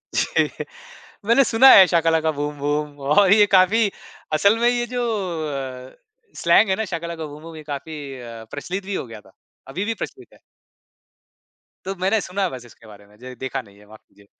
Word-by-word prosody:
जी। - - -1 0.6
मैंने 235 +5 +5
सुना 255 +2 +6
है, 190 - +9
शाका 165 -1 +2
लाका 160 -1 +1
बूम 145 0 -4
बूम 145 0 -2 0.2
और 195 0 +5
ये 210 -1 +6
काफ़ी 205 +4 +4 0.4
असल 200 +8 +3
में 235 - +3
ये 240 0 0
जो 245 - 0 0.9
अ, - - -23 0.5
स्लैंग 180 +5 +4
है 190 - +2
ना, 220 - -3
शाका 170 -3 -5
लाका 165 -2 -6
बूम 150 0 -10
बूम, 165 0 -10
ये 155 - -10
काफ़ी 145 +1 -7 0.3
अ, 115 -2 -9
प्रचलित 185 +7 -5
भी 200 0 -4
हो - - -4
गया 110 -2 -11
था। 95 - -21 0.4
अभी 180 +9 -4
भी 225 - -1
प्रचलित - - -9
है। - - -20 1.5
तो 195 +1 -3
मैंने 195 +4 +1
सुना 195 +1 -4
है 185 - 0
बस 125 -2 -9
इसके 115 -1 -18
बारे 105 -1 -15
में, 105 +1 -22
ज 125 +2 -10
देखा 130 -1 -4
नहीं 100 -3 -20
है, 105 - -19
माफ़ 110 0 -15
कीजिए। 100 0 -23
160 Hz, 205 wpm, -21 LUFS, 130-200 Hz, 1.5 s, है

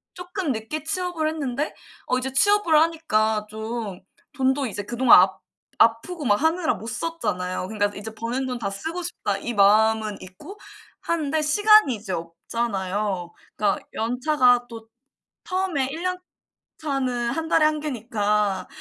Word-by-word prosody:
쪼끔 360 -3 -3
늦게 225 +8 -5
취업을 345 -1 -2
했는데 290 -2 -3 0.3
어 255 - +1
이제 260 +1 -4
취업을 410 +2 +4
하니까 220 -10 +1
좀 220 -3 -5 0.3
돈도 265 0 +1
이제 205 -1 -4
그동안 240 +4 +6
아 - - +4 0.5
아프고 260 +9 +2
막 205 0 +2
하느라 320 +1 +1
못 225 - -9
썼잖아요. 185 - -3
그니까 205 -1 0
이제 215 +2 -7
버는 240 +4 -3
돈 250 -2 -4
다 200 - -2
쓰고 320 - -5
싶다 205 - -3
이 240 +4 -4
마음은 215 +1 +3
있고 185 - -11 0.4
하는데 315 -2 -1
시간이 415 - +5
이제 200 -3 -6
없잖아요. 190 +1 -3 0.2
그니까 205 -2 +1
연차가 245 +1 +2
또 225 -1 -10 0.6
처음에 370 -9 -1
1 325 +4 -6
년 365 0 -1 0.6
차는 255 -5 -1
1 325 +4 -3
달에 310 -2 +4
1 305 0 +2
개니까 210 -7 -1
245 Hz, 285 characters per minute, -24 LUFS, 215-315 Hz, 0.6 s, 그동안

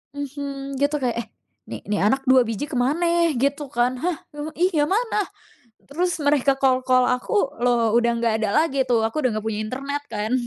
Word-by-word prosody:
Mhm, 275 -1 -5
gitu 285 +1 +1
kayak, 240 -2 0
"Eh, - - -5 0.4
nih - - -7
nih 205 -1 0
anak 270 +4 +1
2 260 -1 +5
biji 225 +4 -3
kemana?" 275 +8 +1 0.3
gitu 280 +3 -1
kan. 245 0 0
"Hah? 350 -1 -1 0.4
Iya 330 -4 +2
mana?" 445 +3 0 0.7
Terus 345 +4 -1
mereka 285 -2 +2
call-call 255 -1 +3
aku, 275 +4 0
loh, 235 -2 +2
udah 235 0 +3
nggak 230 -2 +1
ada 205 - +1
lagi 275 -4 0
tuh, 230 -3 +1
aku 295 +7 -3
udah 255 - +2
nggak 215 - -7
punya 215 -1 -2
internet 275 +5 -4
kan. 215 +3 -3
270 Hz, 180 wpm, -23 LUFS, 240-290 Hz, 0.7 s, 2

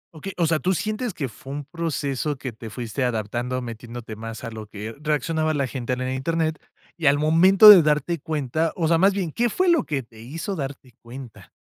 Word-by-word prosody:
Okey. 175 +5 -7
O 170 - +2
sea, 160 -1 +1
tú 185 +4 +1
sientes 215 +4 -2
que 140 -6 -4
fue 135 +4 -10
un 145 0 -4
proceso 150 -2 -3
que 130 -1 -5
te 115 0 -10
fuiste 120 +3 -3
adaptando, 120 +2 -2
metiéndote 115 -1 -8
más 115 0 -7
a 115 - -5
lo 110 -1 -8
que 105 +2 -7
reaccionaba 155 +1 0
la 140 -3 0
gente 125 -1 -3
en 125 - -3
el 130 0 -2
Internet, 160 +3 -1 0.4
y, 170 - -4
al 140 +1 +5
momento 180 +7 +7
de 200 -4 +11
darte 150 +2 0
cuenta, 155 +2 -2
o 165 -3 0
sea, 165 - +4
más 195 +4 +4
bien, 185 -5 -2
¿qué 240 +9 +1
fue 365 - +1
lo 335 -2 +3
que 140 -3 -2
te 115 -1 -18
hizo 165 - -5
darte 135 -3 -6
cuenta? 120 -1 -11
145 Hz, 215 wpm, -23 LUFS, 125-165 Hz, 0.4 s, de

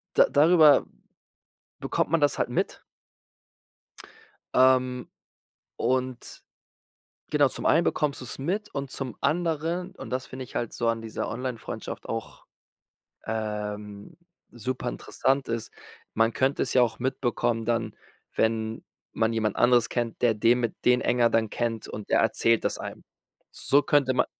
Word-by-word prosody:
da - - +7
darüber 155 0 +6 1.0
bekommt - - -1
man 165 -2 +2
das 145 - +2
halt - - +1
mit. - - -2 1.7
Ähm, 130 -1 +3 0.7
und 130 0 -2 0.9
genau, 145 -2 +4
zum - - -4
einen 165 +2 +4
bekommst 145 -3 0
du - - -7
es 120 - -7
mit 195 +9 -3
und 140 -1 -4
zum 130 -5 -4
anderen, 170 +3 -1
und - - -9
das 130 +1 -2
finde 130 0 -7
ich - - -16
halt 120 - -2
so 120 -1 -1
an 115 0 0
dieser 110 - -4
Onlinefreundschaft 125 -3 -5
auch, - - -6 0.8
ähm, 105 -2 -5 0.3
super 125 +2 -4
interessant 130 - -1
ist, 115 -1 -3 0.4
man 115 +1 +3
könnte 135 +2 +1
es - - -2
ja 125 - +5
auch 115 -1 0
mitbekommen 120 -3 -1
dann, 115 -2 -1 0.4
wenn 110 0 0 0.3
man 110 0 0
jemand 110 -2 0
anderes 120 -1 +4
kennt, 120 -2 -3
der 120 -2 +4
den 115 +3 +3
mit 115 - -1
den 125 0 +4
enger 120 -1 +3
dann 110 -2 +1
kennt 115 -2 -2
und 105 -1 -7
der - - +4
erzählt 115 0 +2
das - - -1
einem. - - -8 0.5
So 145 +1 +2
könnte 140 -3 +2
man 125 - +2
125 Hz, 150 wpm, -26 LUFS, 115-135 Hz, 1.7 s, da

